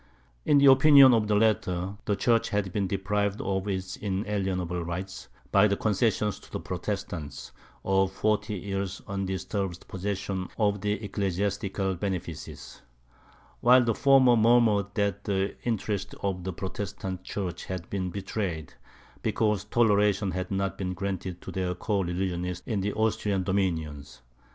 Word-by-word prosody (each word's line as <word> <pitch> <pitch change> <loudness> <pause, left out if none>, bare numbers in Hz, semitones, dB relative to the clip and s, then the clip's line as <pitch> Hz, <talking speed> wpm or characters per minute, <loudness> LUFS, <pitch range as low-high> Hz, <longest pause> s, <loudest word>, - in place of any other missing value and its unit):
In 145 - +5
the 140 - +5
opinion 135 -1 +8
of 110 -2 +2
the 105 - +2
latter, 100 -3 +1
the 105 - +1
church 115 +2 +2
had 100 -3 -1
been 100 -2 0
deprived 100 +1 -1
of 95 0 -2
its 95 -1 -3
inalienable 95 -3 -2
rights, 85 -6 -5 0.2
by 100 +1 +6
the 100 -1 0
concession 105 0 +1
to - - -13
the - - -3
Protestants 75 -5 -5 0.3
of 95 0 +2
forty 105 +1 0
years' 95 0 -4
undisturbed 95 -1 -3
possession 95 -1 -3
of 100 -2 +1
the 105 0 0
ecclesiastical 100 -1 -2
benefices; 90 -4 -5 0.8
while 125 +1 +6
the 115 -1 +1
former 135 -1 +5
murmured 110 -3 +4
that 100 -1 -1
the 100 -1 0
interests 105 -4 -2
of 95 -2 -2
the 95 - -2
Protestant 95 0 -5
church 95 -5 -4
had 90 -3 -5
been 95 -2 -2
betrayed, 95 -4 -4 0.5
because 105 -3 0
toleration 105 -3 +2
had 95 0 -3
not 95 -2 -2
been 90 -1 -2
granted 95 -1 -4
to - - -7
their 90 -1 -2
co 100 +2 -1
religionists 90 0 -3
in 105 -5 -1
the 100 +2 -1
Austrian 105 -3 0
dominions. 80 -9 -2
100 Hz, 140 wpm, -27 LUFS, 95-105 Hz, 0.8 s, opinion